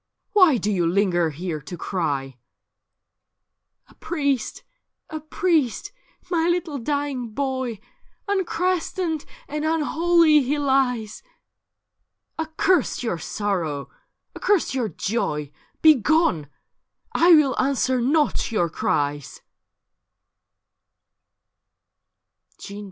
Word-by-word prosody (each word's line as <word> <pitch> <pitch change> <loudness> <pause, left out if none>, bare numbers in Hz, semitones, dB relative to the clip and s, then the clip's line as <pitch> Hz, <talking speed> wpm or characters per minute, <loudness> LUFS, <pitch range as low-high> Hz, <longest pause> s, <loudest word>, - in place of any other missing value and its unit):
Why 365 - +6
do 210 0 -1
you 175 -4 +1
linger 175 -2 +2
here 160 0 -5
to 175 +5 -8
cry? 140 -8 -3 0.6
' - - -60
' - - -54
A - - -20
priest! 280 -8 -2 0.5
A 315 - -4
priest! 310 -4 0 0.4
My 335 -1 +2
little 345 -5 -1
dying 280 -2 -2
boy! 260 -2 -3 0.5
Unchristened 365 -4 -1 0.2
and 300 +1 -4
unholy 325 0 +3
he 280 +3 -1
lies.' 265 -6 0 0.6
* - - -34
Accurst 320 -2 +1
your 200 -8 -2
sorrow, 165 -7 -3 0.4
accurst 405 -9 +1
your 245 -5 -1
Joy 150 -6 -2
— - - -41
Begone! 300 - +4 0.7
1 345 0 +7
will 275 -4 +2
answer 260 -1 +1
not 290 0 +1
your 175 -7 0
cries.' 145 -1 -2
265 Hz, 95 wpm, -23 LUFS, 190-315 Hz, 0.7 s, 1